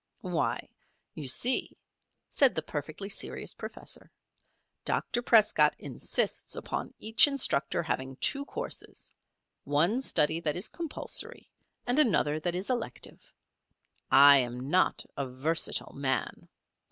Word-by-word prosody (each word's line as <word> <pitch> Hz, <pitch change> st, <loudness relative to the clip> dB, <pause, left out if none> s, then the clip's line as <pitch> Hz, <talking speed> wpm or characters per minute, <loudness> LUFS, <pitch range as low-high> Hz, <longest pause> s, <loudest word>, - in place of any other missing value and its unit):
"Why, -, -, -1 dB, 0.5 s
you 145 Hz, -, -6 dB
see," 245 Hz, -, +2 dB, 0.5 s
said 275 Hz, -3 st, +3 dB
the -, -, -1 dB
perfectly 155 Hz, +6 st, -5 dB
serious 200 Hz, -, -3 dB
professor, -, -, -7 dB, 0.7 s
"Dr. 240 Hz, -, 0 dB
Prescott 225 Hz, -3 st, +4 dB
insists -, -, 0 dB
upon -, -, -5 dB
each 225 Hz, +6 st, +5 dB
instructor 270 Hz, -, 0 dB
having 135 Hz, -4 st, -3 dB
two 280 Hz, -, 0 dB
courses -, -, -6 dB, 0.5 s
one 170 Hz, -, +1 dB
study 160 Hz, -, +2 dB
that 155 Hz, -3 st, -1 dB
is 185 Hz, -, +1 dB
compulsory, 335 Hz, -3 st, -4 dB, 0.3 s
and 245 Hz, +4 st, +1 dB
another 155 Hz, -, +2 dB
that 175 Hz, +2 st, -2 dB
is 190 Hz, +7 st, -2 dB
elective. 240 Hz, -2 st, -5 dB, 0.8 s
I 140 Hz, 0 st, +8 dB
am 125 Hz, +2 st, -3 dB
not 185 Hz, +1 st, +2 dB
a 140 Hz, -2 st, -3 dB
versatile 150 Hz, +6 st, -1 dB
man. 135 Hz, -1 st, -3 dB
165 Hz, 115 wpm, -29 LUFS, 140-235 Hz, 0.8 s, I